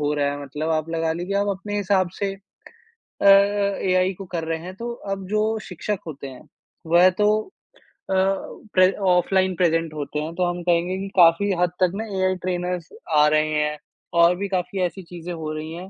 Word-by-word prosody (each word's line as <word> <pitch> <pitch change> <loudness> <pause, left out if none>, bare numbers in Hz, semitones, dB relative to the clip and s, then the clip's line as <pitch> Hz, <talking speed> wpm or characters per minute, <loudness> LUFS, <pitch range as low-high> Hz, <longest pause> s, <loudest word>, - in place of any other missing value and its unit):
हो 150 0 0
रहा 145 -1 +1
है। 145 0 -5
मतलब 150 +3 -4
आप 155 0 0
लगा 165 -1 0
लीजिए 180 +4 -3
आप 200 0 0
अपने 205 +2 -5
हिसाब 195 -2 +1
से 200 -1 -1
अ - - -16 0.8
अ, 200 0 +4
एआई 185 0 +2
को 195 +1 -9
कर 165 - -2
रहे 165 0 -1
हैं। 185 +1 -8
तो 235 +4 -5 0.2
अब 195 -1 -6
जो 215 +1 +1 0.2
शिक्षक 190 +3 -3
होते 140 -3 -7
हैं 130 +3 -12 0.4
वह 175 +3 +6
तो 210 - +5 0.8
अ, - - 0 0.6
प्रे 185 0 +5 0.2
ऑफ़लाइन 185 +1 +2
प्रेज़ेंट 165 -2 +1
होते 150 0 -4
हैं। 155 +2 -4
तो 180 +1 +1
हम 175 0 -4
कहेंगे 175 +1 +1
कि 195 +1 -4
काफ़ी 175 +4 +5
हद 180 - +2
तक 180 - +3
ना 220 +2 -3
एआई 185 0 +2
ट्रेनर्स 180 -2 -2 0.3
आ 150 - +6
रहे 155 0 +2
हैं। 150 0 0 0.4
और 170 +1 +6
भी 200 - -2
काफ़ी 190 0 -2
ऐसी 180 +2 -2
चीजें 175 0 -8
हो 160 -2 -5
रही 155 +1 -6
हैं 180 +3 -8
180 Hz, 200 wpm, -23 LUFS, 160-195 Hz, 0.8 s, वह